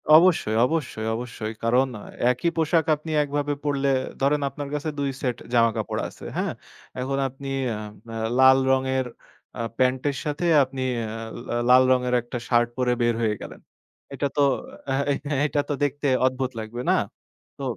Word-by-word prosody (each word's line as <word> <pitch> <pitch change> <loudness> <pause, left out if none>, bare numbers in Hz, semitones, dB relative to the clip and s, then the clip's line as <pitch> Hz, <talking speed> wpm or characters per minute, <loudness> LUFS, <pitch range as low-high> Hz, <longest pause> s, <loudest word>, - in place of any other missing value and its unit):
অবশ্যই, 160 -10 +5
অবশ্যই, 130 -7 -2
অবশ্যই। 115 -2 -5
কারণ 125 +3 +3
আ - - -11 0.3
একই 130 +7 0
পোশাক 160 0 +2
আপনি 155 +2 -8
একভাবে 145 0 -1
পড়লে 140 -1 +1 0.3
ধরেন 145 +2 +2
আপনার 145 0 -6
কাছে 150 +1 -2
২ 140 -1 0
সেট 125 -3 -1 0.2
জামাকাপড় 115 -2 +2
আছে। - - -13
হ্যাঁ? - - -1 0.5
এখন 135 +2 -1
আপনি 135 +2 -8 0.2
অ্যা 110 -2 -3 0.3
অ্যা 115 - -5 0.2
লাল 130 0 +8
রঙের 130 0 +1 0.5
আ - - -1 0.2
প্যান্টের 130 +2 +1
সাথে 150 +3 -2 0.2
আপনি 130 0 -4 0.2
অ্যা 110 0 -4 0.3
লা - - 0
লাল 130 +1 +8
রঙের 125 -1 +2
একটা 120 +1 -6
শার্ট 120 -1 +3
পরে 125 -1 +2
বের 120 -1 +2
হয়ে 110 -2 +1
গেলেন। - - -9 0.5
এটা 140 +1 0
তো - - +4 0.5
এহে 140 +1 +1
অ্যা 145 0 -1
এটা 145 0 +1
তো - - +1
দেখতে 145 +1 0 0.2
অদ্ভুত 130 0 0
লাগবে 110 +2 -5
না? - - +4 0.6
তো 140 - -7
130 Hz, 165 wpm, -24 LUFS, 120-145 Hz, 0.6 s, লাল